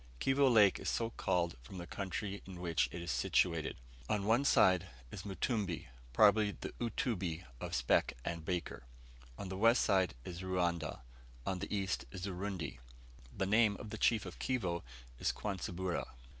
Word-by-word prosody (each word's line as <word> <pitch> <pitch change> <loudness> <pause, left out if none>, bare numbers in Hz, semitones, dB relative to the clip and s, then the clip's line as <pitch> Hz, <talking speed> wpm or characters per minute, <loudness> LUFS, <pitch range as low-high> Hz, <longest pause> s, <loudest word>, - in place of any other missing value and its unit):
Kivo 135 - +4
Lake 105 -4 +6
is - - -2
so 115 0 0
called 85 - 0
from 65 +10 -10
the 85 - -5
country 100 +2 -4
in 90 -2 -8
which 80 -8 +1
it 85 0 -5
is 85 - -2
situated. 85 -4 +1 0.3
On 100 -2 +1
one 115 +6 +4
side 95 -7 +5 0.2
is 90 - -7
Mutumbi 100 - -2 0.2
(probably 105 - +5
the - - -5
Utumbi 95 -8 -1 0.2
of - - -3
Speke - - +3
and 85 -1 -3
Baker), 90 -4 -3 0.6
on 100 - -5
the 95 - -4
west 115 +1 +4 0.3
is 90 0 -6
Ruanda; 85 -5 -1 0.4
on 95 -1 -1
the 100 - -5
east 100 -2 -1
is 95 -2 -5
Urundi. 95 -6 -4 0.6
The 95 - +1
name 105 0 +4
of 105 - -8
the 110 - -4
chief 110 -4 +3
of 90 - -8
Kivo 95 -10 -1 0.4
is - - +2
Kwansibura. 95 -3 -3
95 Hz, 160 wpm, -35 LUFS, 85-105 Hz, 0.6 s, Lake